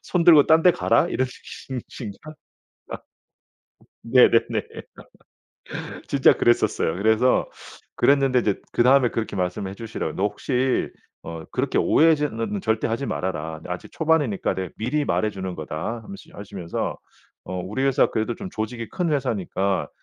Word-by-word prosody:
손들고 170 -5 +5
딴 160 0 +5
데 180 - +7
가라?' 170 - +2
이런 130 -6 0
진 130 0 -8
진짜 105 -6 -8 1.8
네네네. 115 -1 +4 1.5
진짜 140 -2 +5
그랬었어요. 120 -8 +1
그래서 110 +6 +2 0.5
그랬는데 135 -2 +3
이제 105 -5 -1
그다음에 125 +1 +4
그렇게 115 -3 -4
말씀해 95 +1 -2
주시더라고요. 110 -7 -5
"너 95 - -2
혹시 130 +4 0 0.3
어 80 -1 -7
그렇게 - - -1
오해하지는 130 -10 +2
절대 110 0 0
하지 115 +5 -2
말아라. 80 -6 -4
아직 90 0 -6
초반이니까 155 - +1
내가 95 -1 -4
미리 125 +7 -1
말해 110 - +1
주는 95 -2 -5
거다." 80 +9 -5
하면시 200 0 -11
하시면서 100 -4 -5 0.5
"어 90 0 -4
우리 105 +8 -3
회사 135 0 +4
그래도 110 +2 -2
좀 190 - -7
조직이 115 +1 -4
큰 175 -4 -1
회사니까 100 -8 -1
115 Hz, 320 characters per minute, -23 LUFS, 95-135 Hz, 1.8 s, 데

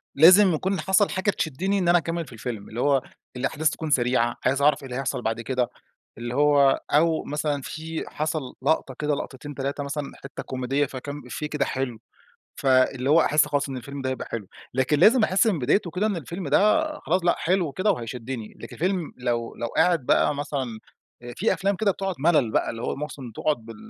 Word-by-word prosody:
لازم 185 +5 +7
يكون 190 +4 -1
حصل 190 +5 +3
حاجة 190 +2 0
تشدني 190 +6 -1
إن 180 - 0
أنا 175 - +6
أكمل 165 0 -2
في - - -12
الفيلم. 110 -2 -6
اللي 115 +3 -4
هو 140 -2 +3 0.3
الأحداث 140 +4 0
تكون 160 0 -5
سريعة، 120 -3 +2
عايز 135 +2 +2
أعرف 150 0 +4
إيه - - -7
اللي 125 - -5
هيحصل 130 -2 -2
بعد 115 0 -2
كده. 125 0 -1 0.5
اللي 120 +1 -5
هو 145 -1 +4
أو 160 +2 +3
مثلًا 150 -1 -2
في 160 +3 -5
حصل 155 +1 -2 0.2
لقطة 140 -2 +1
كده 150 -1 0
لقطتين، 140 +2 -7
3 140 +2 -3
مثلًا 140 0 -4
حتّة 135 +1 -7
كوميدية 130 +3 -1
فكام 145 +2 -7
إفيه 150 +4 -4
كده 150 -2 0
حلو، 130 -4 -3 0.6
فاللي 130 0 +3
هو 165 +2 +6
أحس 150 -1 +3
خلاص 145 0 -1
إن 135 - -5
الفيلم 140 +3 -7
ده 130 - -1
هيبقى 130 - -5
حلو. 115 -4 -5 0.3
لكن 130 +3 +2
لازم 225 - +6
أحس 195 +3 +3
من 195 -8 +2
بدايته 165 +8 +1
كده 190 +5 0
إن 210 -3 -1
الفيلم 170 +2 -5
ده 215 - +4 0.2
خلاص 180 +2 0
لأ، 175 - +4
حلو 175 -4 0
كده 185 +9 +1
وهيشدني. 120 -1 -5
لكن - - -9
الفيلم 180 -1 -1
لو 120 -2 -2
لو 120 - -3
قاعد 165 +1 +2
بقى - - +3
مثلًا 135 -6 -4 0.4
آآ 120 - -8
في 220 - +2
أفلام 195 +1 0
كده 205 +1 +2
بتقعد 195 0 -2
ملل 150 -5 +3
بقى - - +1
اللي 115 0 -6
هو - - -2
مس 150 +2 -5 0.2
تقعد 150 +4 0
بال 115 - -9
145 Hz, 205 wpm, -25 LUFS, 130-170 Hz, 0.6 s, لازم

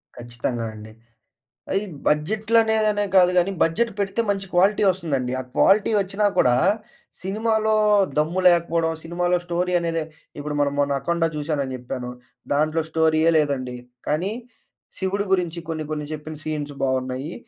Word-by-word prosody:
ఖచ్చితంగా 120 0 -4
అండి. 110 0 -11 0.8
అది 195 - +2 0.3
బడ్జెట్‌లనేదనే 215 +5 +2
కాదు 180 -1 +6
గానీ 180 +2 +3
బడ్జెట్ 225 +9 +2
పెడితే 200 +3 0
మంచి 195 -1 -1
క్వాలిటోస్తుందండి. 175 -8 +2
ఆ - - -1
క్వాలిటీ 200 +3 +4
ఒచ్చినా 195 +2 -1
కూడా 125 -1 +4 0.7
సినిమాలో 220 +3 0 0.4
దమ్ము 160 +5 +1
లేకపోవడం, 170 -1 +3
సినిమాలో 175 +2 0
స్టోరీ 180 +1 -1
అనేదె 165 -1 -1 0.4
ఇప్పుడు 150 0 -4
మనం 140 -1 +1
మొన్న 140 -1 +1
'అఖండ' 165 +4 0
జూసానని 145 -3 -2
జెప్పాను, 125 0 -6 0.4
దాంట్లో 155 +2 +1
స్టోరీయే 160 0 +3
లేదండి. 135 -4 -1 0.3
కానీ, 170 +7 0 0.7
'శివుడు' 200 +2 -1
గురించి 175 -2 0
కొన్ని 155 -1 -3
కొన్ని 150 -1 -4
చెప్పిన 155 +1 -7
సీన్స్ 150 -2 -4
బాగున్నాయి. 130 +3 -2
165 Hz, 125 wpm, -23 LUFS, 145-190 Hz, 0.8 s, కాదు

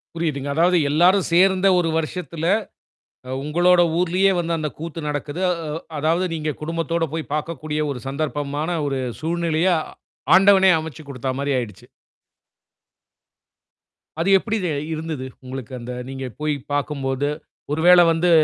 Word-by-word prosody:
புரிதுங்க. 150 -4 -2
அதாவது 175 +3 +4
எல்லாரும் 180 +6 +4
சேர்ந்த 190 +2 +4
ஒரு 170 -2 0
வருஷத்துல, 165 0 -4 0.8
அ - - -8
உங்களோட 175 +4 +4 0.2
ஊர்லயே 180 +2 +3
வந்து 170 0 -1
அந்த 155 -1 -2
கூத்து 165 +1 -6
நடக்குது. 145 +3 -4
அ, - - +2 0.2
வ் 165 - -5 0.2
அதாவது 165 +5 +1
நீங்க 155 -1 -2
குடும்பத்தோட 165 +1 -1
போய் 160 -1 -4
பாக்கக்கூடிய 155 -1 -3
ஒரு 125 -3 -6
சந்தர்ப்பமான 145 +3 -2
ஒரு 135 -1 -2 0.2
சூழ்நிலைய 170 +1 0 0.7
ஆண்டவனே 190 0 +6
அமைச்சு 160 0 -8
கொடுத்தா 130 -1 -4
மாரி 140 0 -1
ஆயிடுச்சு. 115 -4 -8 2.3
அது 170 +4 +1
எப்டி 220 +3 -2
தே 175 - 0 0.2
இருந்தது 155 -4 -4 0.2
உங்களுக்கு 130 -1 -7
அந்த, 120 +1 -7 0.2
நீங்க 135 0 -5
போய் 150 0 0 0.2
பார்க்கும்போது. 140 -1 -1 0.4
ஒரு 155 +2 -1
வேளை 180 -1 +8
வந்து 165 +2 +1
160 Hz, 135 wpm, -22 LUFS, 145-175 Hz, 2.3 s, வேளை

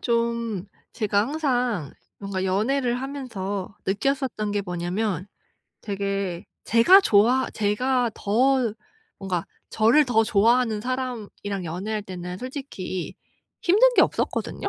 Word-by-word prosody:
좀 235 -4 -1 0.3
제가 210 -3 +1
항상 250 - -1 0.3
뭔가 195 -2 -3
연애를 240 +6 0
하면서 205 -9 -5
느꼈었던 215 0 -1
게 205 - 0
뭐냐면 180 +1 -2 0.5
되게 200 -3 -3 0.2
제가 235 - +7
좋아 245 - +3
제가 240 +4 +1
더 245 +2 +2 0.5
뭔가 185 -4 -3 0.2
저를 230 +8 +4
더 225 -4 +3
좋아하는 225 +1 +3
사람이랑 230 -6 -4
연애할 195 +6 -3
때는 180 -2 -7
솔직히 255 - -5 0.5
힘든 465 +8 +5
게 - - +7
없었거든요. - - -1
220 Hz, 240 characters per minute, -24 LUFS, 195-255 Hz, 0.5 s, 제가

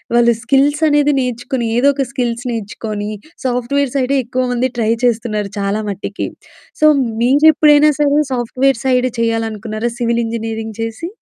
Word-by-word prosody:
వాళ్ళు 235 0 +5
స్కిల్సనేది 290 +3 +3
నేర్చుకుని, 245 0 -3
ఏదో 275 +4 +4
ఒక 275 - 0
స్కిల్స్ 245 -2 -2
నేర్చుకొని 210 -1 -5 0.3
సాఫ్ట్‌వేర్ 250 +2 0
సైడే 270 +1 +1
ఎక్కువమంది 250 0 -1
ట్రై 220 0 +1
చేస్తున్నారు 215 -4 -1
చాలా 200 +2 -1
మట్టికి. 200 +1 -4 0.5
సో, - - +5 0.4
మీరెప్పుడైనా 295 +2 +5
సరే 290 0 +3
సాఫ్ట్‌వేర్ 255 +1 0
సైడ్ 255 -1 +2
చేయాలనుకున్నారా, 225 0 -2
సివిల్ 235 0 +1
ఇంజినీరింగ్ 225 -1 -5
చేసి? 225 +10 -4
240 Hz, 125 wpm, -16 LUFS, 225-275 Hz, 0.5 s, వాళ్ళు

